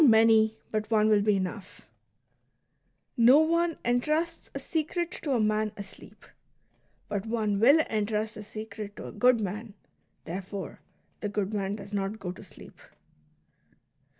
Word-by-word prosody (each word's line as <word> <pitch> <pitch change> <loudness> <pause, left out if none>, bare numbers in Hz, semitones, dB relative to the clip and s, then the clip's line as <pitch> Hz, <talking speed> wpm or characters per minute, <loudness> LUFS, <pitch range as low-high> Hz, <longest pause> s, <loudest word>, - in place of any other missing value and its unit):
many, 220 -3 +5
but 215 0 -2
one 215 -1 +3
will 210 -1 +4
be 210 0 +3
enough: 190 +1 -5 0.7
" - - -48
No 245 +4 +7
one 335 +1 +2
entrusts 305 +8 0
a - - -2
secret 330 +4 -2
to 285 - -1
a 245 - +2
man 215 0 +1
asleep; 200 -1 -11 0.8
but 205 +1 -3
one 215 -3 0
will 280 +8 +6
entrust 215 -3 -1
a 215 - -7
secret 210 -1 -8
to - - -8
a - - -7
good 245 +3 +4
man; 210 +1 -5 0.5
therefore, 190 +3 -6 0.4
the 210 - -3
good 205 0 -2
man 200 -1 -1
does 200 0 -10
not 200 +1 -2
go 180 -4 -5
to 180 - -11
sleep." - - -15
215 Hz, 150 wpm, -28 LUFS, 205-240 Hz, 0.8 s, No